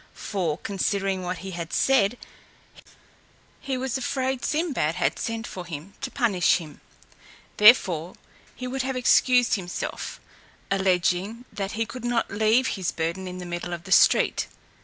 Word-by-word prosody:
For, 175 -7 -2
considering 195 -1 -1
what 180 0 -3
he 190 - -5
had 170 -2 -6
said, 245 -4 +3 1.4
he 270 -2 -3
was 265 0 -2
afraid 265 0 -2
Sinbad 295 - 0
had 180 - 0
sent 230 0 -3
for 185 - -7
him 170 +3 -8
to - - -3
punish 205 -9 +2
him: 155 -4 -10 0.8
therefore 185 -6 +5 0.4
he 255 - -6
would 265 +1 -2
have 265 0 -2
excused 250 0 +4
himself, 180 -3 -4 0.5
alleging, 190 +4 +1
that 200 -1 -4
he 225 +1 -1
could 235 +2 -9
not 240 -1 0
leave 220 +5 +3
his 185 -3 -2
burden 170 +3 -3
in 180 0 -6
the 180 - -7
middle 175 0 -4
of 170 -1 -6
the 190 - -10
street. - - +4
200 Hz, 150 wpm, -25 LUFS, 180-245 Hz, 1.4 s, therefore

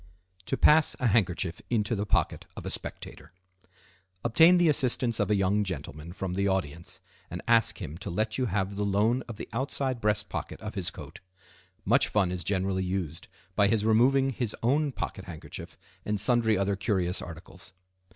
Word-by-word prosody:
To 135 - -1
Pass 155 0 +5
a 125 - -1
Handkerchief 95 -6 +1
into 110 -2 0
the 105 -1 -2
Pocket - - 0
of - - -7
a - - -3
Spectator.—Obtain 95 - -1
the 175 -1 +4
assistance 125 -5 +2
of 105 - +1
a 105 - +3
young 100 +2 +2
gentleman 80 -3 -6
from 95 0 -4
the 100 +2 0
audience, 85 -4 -3 0.3
and 90 - -5
ask 115 -2 +3
him 80 +4 -7
to 110 - -5
let 110 +5 -1
you 130 - +1
have 100 0 -2
the 105 - 0
loan 105 +5 +2
of 115 - -7
the - - -7
outside 130 0 -1
breast 105 -1 0
pocket - - -5
of - - -6
his - - -1
coat. - - -10 0.7
Much - - +4
fun 100 -4 +1
is 90 -2 -3
generally 95 0 0
used 90 -4 -4 0.3
by 100 -1 +4
his 105 0 +1
removing 130 +5 +4
his 120 -4 -3
own 145 +4 +2
pocket 95 -6 -5
handkerchief 85 -4 -9 0.3
and 105 -1 -1
sundry 115 -1 +3
other 100 +1 0
curious 95 -3 -1
articles. 90 +2 -11
100 Hz, 175 wpm, -28 LUFS, 95-115 Hz, 0.7 s, Pass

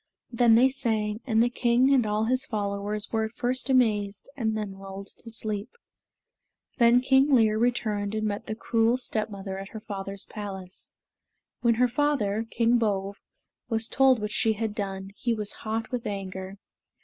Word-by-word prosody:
Then 235 -1 +5
they 245 +3 +6
sang, 220 -5 -1
and 225 -1 +4
the 240 - +2
king 245 +2 +3
and 245 -5 +3
all 210 +1 0
his 255 +3 0
followers 205 0 -3
were 220 -1 +1
at 220 - -8
first 255 0 0
amazed 210 -6 +2
and 220 -5 -1
then 210 -2 -3
lulled 195 0 -9
to 230 - -9
sleep. 215 0 -3 1.1
Then 240 +1 +6
King 265 +2 +4
Lir 220 -2 +3
returned 215 -4 0
and 215 0 -1
met 205 -1 -3
the 215 - -3
cruel 230 +1 +2
stepmother 205 -5 -3
at 195 +1 -8
her 220 - -7
father's 200 -2 -6
palace. 195 -3 -8 0.7
When 235 -2 +3
her 250 +2 +3
father, 235 -5 0
King 235 +1 +2
Bove, 200 -3 -1 0.5
was 225 -1 +1
told 265 -2 +4
what 210 0 -3
she 220 +1 +2
had 220 0 -3
done, 195 -2 -4
he 235 -2 0
was 210 -1 -2 0.2
hot 225 +1 -2
with 245 -2 -3
anger. 190 -1 -5
220 Hz, 170 wpm, -27 LUFS, 205-240 Hz, 1.1 s, they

